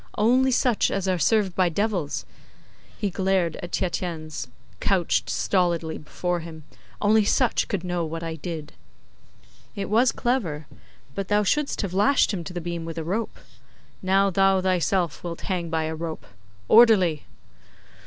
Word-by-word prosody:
Only 250 +5 +4
such 245 -3 +2
as 195 -1 -2
are 185 -2 +1
served 205 +2 +2
by 185 -2 +3
devils,' 185 -4 -2 0.7
he 205 -3 -2
glared 185 -3 0
at 175 - -7
Tietjens, 165 -5 -3 0.3
couched 185 -4 +1
stolidly 170 -4 0
before 175 +3 -3
him, 160 -1 -9 0.4
'only 215 +1 +4
such 240 +3 +2
could 195 -3 -3
know 175 -1 -2
what 165 +1 -5
I 165 -1 -3
did.' 155 -2 -6 1.0
'It 200 0 -4
was 235 +3 +4
clever. 180 - -1 0.5
But 195 +3 -4
thou 210 +1 +2
shouldst 285 +4 0
have 190 -3 -4
lashed 215 +6 +3
him 180 -4 -3
to - - -6
the 175 - -3
beam 170 0 -4
with 165 0 -7
a 165 - -2
rope. 205 +8 -3 0.6
Now, 195 +1 +3
thou 195 +1 +3
thyself 185 -2 0
wilt 170 -1 -5
hang 175 -3 -3
by 160 0 0
a 160 0 -3
rope. 160 0 -6 0.4
Orderly! 200 -9 +5
185 Hz, 155 wpm, -24 LUFS, 165-205 Hz, 1.0 s, Orderly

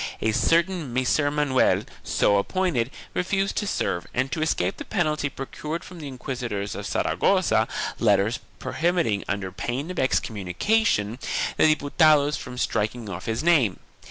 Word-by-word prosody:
A 110 - +1
certain 165 - +1
Micer 130 +4 +1
Manuel, 145 -3 +2 0.2
so 100 - +2
appointed, 145 - 0 0.2
refused 195 +2 0
to 210 - 0
serve 85 - -1
and 130 +1 0
to 160 - -2
escape 95 - 0
the - - -6
penalty 155 -7 0
procured 150 +5 -5
from 180 -2 -11
the 150 - -6
inquisitors 125 -6 -4
of - - -5
Saragossa - - +2 0.3
letters 110 +5 +3 0.2
prohibiting, 165 - 0
under 100 -2 -2
pain 125 - -3
of 185 - -4
excommunication, 110 - +1 0.4
the - - +5
Diputados 150 0 +3
from 125 -1 -7
striking 110 -1 -1
off 95 -1 -6
his 115 +5 -1
name. 145 - +3
130 Hz, 140 wpm, -25 LUFS, 110-165 Hz, 0.4 s, the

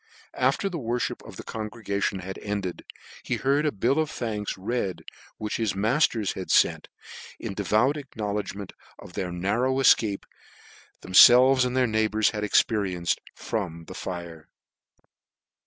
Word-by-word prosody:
After 225 -3 +1
the 175 -4 -4
worfhip 120 -1 -2
of - - -10
the - - -8
congregation 105 -3 -3
was 95 - -4
ended, 100 -4 -4 0.4
he - - -2
heard 140 +3 +1
a - - +1
bill 125 +8 +1
of 155 -1 0
thanks 105 -5 -4
read, 100 -1 -3 0.3
which 105 -1 -3
his 110 -4 -1
matters 110 0 +1
had 95 - -6
fcnt, - - +3 0.5
in - - -5
devout 110 +8 +1
acknowledgement 105 -7 -5 0.2
of - - -13
the 90 -1 -3
nar 95 +7 -1
row 130 +1 +1
efcape 110 -6 +3 0.8
that - - -12
themfelves 125 +6 +8
and 125 +1 -2
their 130 - +4
neighbours 110 -1 +1
had 105 -2 -4
experienced 95 -4 +1
from 85 -7 -4
the 95 - -9
fire. 85 -4 -7
105 Hz, 145 wpm, -26 LUFS, 95-125 Hz, 0.8 s, themfelves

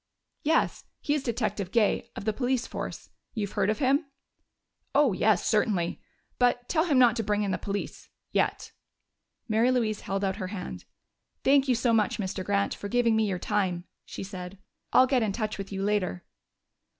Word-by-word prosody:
"Yes. 320 +2 +1
He 290 - 0
is 295 - 0
Detective 215 -6 -2
Gay, 225 -3 +2
of - - -6
the 215 - +1
police 250 +1 0
force. - - -6 0.2
You've 205 -3 -2
heard 205 - +1
of 215 - +1
him?" 280 +3 +2 0.9
"Oh, 285 -6 +5
yes, 205 0 +2
certainly. 205 -6 +1 0.4
But 245 0 +2
tell 320 0 +2
him 295 -6 +2
not 245 -2 +6
to 225 - 0
bring 210 0 0
in 200 - -1
the - - -1
police 200 0 -5 0.2
yet." - - 0 0.8
Mary 225 +2 +3
Louise 225 -5 0
held 195 +1 -2
out 190 0 0
her 185 -4 -3
hand. 185 -2 -6 0.6
"Thank 275 0 +4
you 255 - +3
so 235 0 +2
much, 215 -3 +2
Mr. 190 -2 -3
Grant, 200 +1 +1
for 205 - -6
giving 235 0 +2
me 220 -1 +2
your 185 - -1
time," 180 -2 -1 0.2
she - - -7
said. 185 -1 -7 0.3
"I'll 255 - +7
get 260 -1 +2
in 215 -3 0
touch 215 -2 -3
with 195 0 -6
you 195 0 -3
later." 195 -3 -1
215 Hz, 185 wpm, -28 LUFS, 195-245 Hz, 0.9 s, I'll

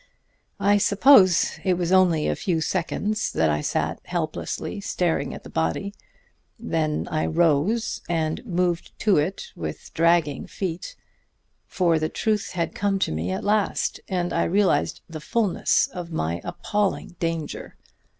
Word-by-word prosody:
"I 205 +1 +4
suppose 200 -4 +5
it 185 -2 +2
was 175 0 -1
only 180 -5 +4
a - - 0
few 175 -5 -1
seconds 205 +6 -1
that 80 -1 +2
I 75 0 0
sat 80 +2 -1
helplessly 175 +4 -3
staring 180 -3 -1
at - - -9
the - - -10
body. 80 - -1 0.6
Then 160 -9 -1
I 155 - 0
rose 170 +7 +1
and 160 -2 -1
moved 175 -5 -1
to 205 -5 +4
it 185 - -2
with - - -7
dragging 165 -4 +2
feet; 185 - -5 0.7
for 175 -3 +1
now - - -1
the 155 0 -1
truth 215 -2 -1
had 170 -2 -2
come 200 -1 0
to 190 - 0
me 80 +3 -2
at 95 - -3
last, 210 0 0
and 180 -2 -1
I - - +1
realized 195 +2 +1
the 160 -2 -8
fullness 210 +3 +1
of 175 -2 -7
my 85 - -2
appalling 205 -2 -2
danger. 165 -2 -3
175 Hz, 150 wpm, -24 LUFS, 160-200 Hz, 0.7 s, suppose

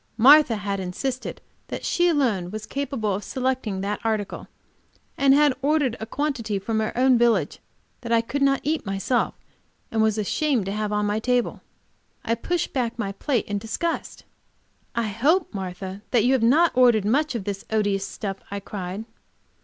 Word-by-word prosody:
Martha 270 +1 +7
had 200 -1 -3
insisted 245 +8 -4 0.3
that - - -5
she 350 0 +2
alone 240 - +1
was 215 +2 -6
capable 270 -7 -2
of 200 +2 -3
selecting 255 -5 -2
that 205 +1 -2
article, 215 -3 -2 0.7
and 275 0 +5
had 295 -1 +5
ordered 285 -4 +2
a 220 - -5
quantity 255 -6 -2
from 220 +3 -2
her 215 - -1
own 255 -1 +4
village 225 -10 +2 0.4
which 235 - -5
I 230 - +5
could 275 +5 -4
not 275 -1 +3
eat 310 +2 -1
myself 195 +5 -1 0.6
and 225 - +1
was 220 -1 +2
ashamed 245 +2 0
to 195 - -3
have 210 0 -2
on 210 0 +1
my 205 +1 0
table. 245 +1 0 0.6
I 230 - +1
pushed 340 +9 -2
back 240 -4 -1
my 205 -4 -2
plate 240 +4 -1
in 205 0 -2
disgust. 280 - -3 0.7
"I 235 -1 0
hope, 280 - +1
Martha, 190 0 -6
that 235 -4 +3
you 250 +3 +3
have 260 - +2
not 300 +9 +4
ordered 240 -5 +5
much 280 +6 +1
of 225 - -3
this 200 0 -4
odious 205 -3 0
stuff!" 195 -2 -5
I 200 - -4
cried. 195 +1 -6
225 Hz, 175 wpm, -24 LUFS, 205-265 Hz, 0.7 s, Martha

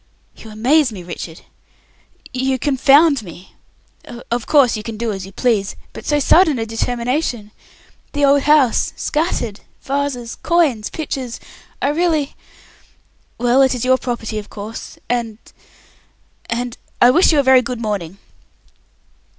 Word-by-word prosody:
"You 220 - -12
amaze 250 +6 +2
me, 190 -4 -8
Richard. 170 -1 -8 0.9
You 260 +1 0
confound 280 +1 +4
me. 180 -1 -13 0.8
Of 240 -1 -2
course 275 -6 +4
you 215 - -4
can 220 0 -7
do 230 0 -2
as 195 -2 -6
you - - -12
please. 210 -2 0 0.2
But - - -10
so 295 - +2
sudden 310 0 +4
a 225 - -2
determination. 235 0 -2 0.6
The 290 -1 +2
old 280 0 +4
house 285 -5 +3 0.2
vases 270 - -3
coins 305 -11 +1
pictures 265 -6 -5
scattered - - -16 0.3
I 280 - +2
really 310 -2 0 1.0
Well, 245 +2 +3
it 265 -1 +3
is 250 - -3
your 260 0 +3
property, 230 -3 -4
of 210 - -10
course 215 +2 -8
and 235 -3 -2 1.1
and 240 +1 -3 0.2
I 245 - +7
wish 345 +7 +4
you 305 - +3
a - - +3
very 260 -1 +6
good 245 -1 -5
morning!" 200 -5 -4
245 Hz, 140 wpm, -18 LUFS, 220-285 Hz, 1.1 s, I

